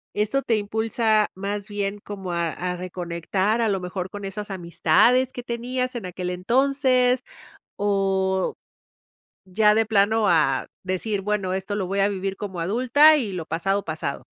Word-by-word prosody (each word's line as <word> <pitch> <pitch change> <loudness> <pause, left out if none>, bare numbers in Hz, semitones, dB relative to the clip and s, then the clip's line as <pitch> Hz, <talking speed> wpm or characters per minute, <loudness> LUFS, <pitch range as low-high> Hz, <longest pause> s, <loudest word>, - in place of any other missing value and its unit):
¿Esto 215 +6 +1
te 235 - +1
impulsa, 220 +1 +1
más 200 +2 -4
bien 205 0 -3
como 195 -3 -6
a 170 -1 0
a 180 +2 -3
reconectar, 180 +4 -2
a 225 - +2
lo 195 -2 0
mejor 180 +1 -5
con 205 +1 -7
esas 205 +2 -5
amistades 195 +8 +3
que 245 - -7
tenías 250 +2 -3
en 230 -6 -5
aquel 180 0 -4
entonces? 255 +5 +2 0.6
O 195 -2 +1 0.9
ya 210 +3 +3
de 225 +1 +3
plano 215 0 +2
a 150 -5 +2 0.2
decir, 190 +3 -1
bueno, 195 -2 -1
esto 190 +2 -3
lo 200 -2 -2
voy 195 +2 -1
a 195 - +4
vivir 195 -1 -3
como 190 -4 -5
adulta, 255 - +5
y 220 -8 -3
lo 175 -3 -4
pasado 195 +5 -1
pasado. 160 -1 -4
200 Hz, 160 wpm, -24 LUFS, 185-225 Hz, 0.9 s, adulta